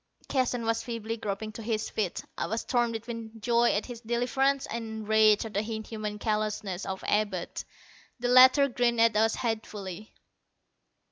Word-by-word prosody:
Keston 250 -3 0
was 225 0 +1
feebly 230 -1 -4
groping 215 0 -4
to 225 - -9
his 220 -1 -2
feet. 200 -5 -2
I - - -2
was 225 +2 -2
torn 240 -2 +1
between 230 0 -7
joy 235 +2 +3
at 205 - -1
his 240 -2 -8
deliverance 260 +4 +1
and 220 -2 -5
rage 215 0 +5
at 220 - -7
the 200 - +1
inhuman 215 -1 -4
callousness 210 -3 -2
of 190 0 -5
Abud. 205 -4 -1 0.6
The 245 - -1
latter 255 +3 +7
grinned 240 -2 +1
at 230 -1 +4
us 220 +1 +3
hatefully. 215 -4 -5
225 Hz, 155 wpm, -28 LUFS, 215-235 Hz, 0.6 s, latter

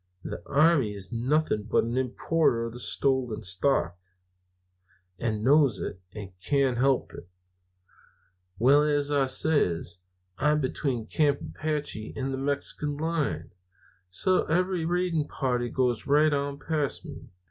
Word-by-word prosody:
The - - -6
army 145 -8 +3
is 95 -2 -4
nothing 125 0 0
but 110 - +2
an 115 +2 -3
importer 130 -1 +1
of 120 +1 -7
stolen 130 -5 0
stock, 90 - 0 1.2
and 110 -1 -2
knows 140 -1 +4
it, 95 - -5
and 100 -3 -8
can't 135 -4 +1
help 135 0 +1
it. 90 - -11 1.3
"Well, 135 +7 +5
as 145 -1 +1
I 140 -2 +2
says, 115 - +1 0.4
I'm 150 +2 +2
between 130 -4 -2
Camp 145 +1 +1
Apache 150 -8 -4
and 135 0 -3
the 135 - -3
Mexican 145 +1 -2
line, 145 - -2 0.6
so 185 - +2
that - - -7
every 180 -1 +1
raiding 175 -3 0
party 125 -4 -1
goes 125 -3 -1
right 150 +2 +4
on 140 0 -2
past 150 -2 -2
me. - - -10
135 Hz, 135 wpm, -27 LUFS, 115-150 Hz, 1.3 s, Well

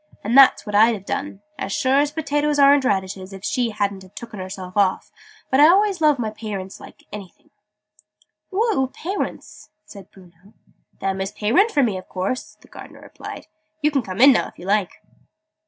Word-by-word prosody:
"And 225 +4 -1
that's 275 -1 +6
what 210 - -6
I'd 220 +3 +5
have 195 -2 -11
done 200 0 -5 0.2
as 195 - -4
sure 265 +6 +2
as 290 0 +2
potatoes 295 -1 -1
aren't 280 -1 +5
radishes 190 -2 -2
if 195 0 -10
she 240 +3 0
hadn't 200 -2 -2
have 185 0 -17
tooken 230 -4 -9
herself 185 0 -8
off! 195 -2 +1 0.4
But 265 - +3
I 295 - +8
always 390 0 +3
loves 300 -2 +4
my 225 -3 -3
pay 215 -1 -6
rints 190 0 -7
like - - -14
anything." 200 -3 -11 1.0
"Who 400 +3 0
are 455 -3 +1
oor 265 - +1
pay 355 +8 -6
rints?" - - -6 0.2
said 200 -2 -13
Bruno. 185 +2 -20 0.5
"Them 190 0 -2
as 195 +1 -3
pay 210 0 -3
rint 395 - +4
for 290 -10 +2
me, 205 -6 -1
a - - -8
course!" 190 +7 -5
the - - -19
Gardener - - -13
replied. - - -10 0.4
"You 300 - +3
can 280 -2 +1
come 190 -3 -7
in 275 +3 +8
now, 245 - +1
if - - -17
you 175 - -11
like." 200 -1 -1
215 Hz, 205 wpm, -21 LUFS, 195-280 Hz, 1.0 s, I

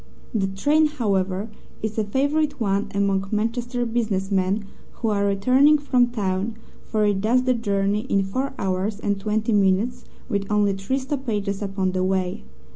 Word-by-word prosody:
The 200 -4 +1
train, 290 +11 +3
however, 200 -6 -1 0.3
is 220 0 -2
a - - +2
favourite 285 +7 0
one 200 -2 0
among 195 -1 +1
Manchester 240 +3 -1
business 215 -4 -1
men 195 +2 +1 0.3
who 225 - -2
are 200 -1 +1
returning 255 +10 +4
from 255 -4 +2
town, 205 -2 -2 0.3
for 215 -1 0
it 200 -2 +1
does 240 +4 +3
the 255 0 +3
journey 205 0 0
in 195 -1 +3
four 260 +9 -2
hours 195 +2 -1
and 205 -2 -1
twenty 215 +2 0
minutes, 200 +4 +2 0.2
with 200 0 -2
only 205 -1 +3
three 195 +7 -2
stoppages 230 -8 -2
upon 195 -2 -1
the 185 0 -1
way. 185 - -1
210 Hz, 160 wpm, -23 LUFS, 195-240 Hz, 0.3 s, returning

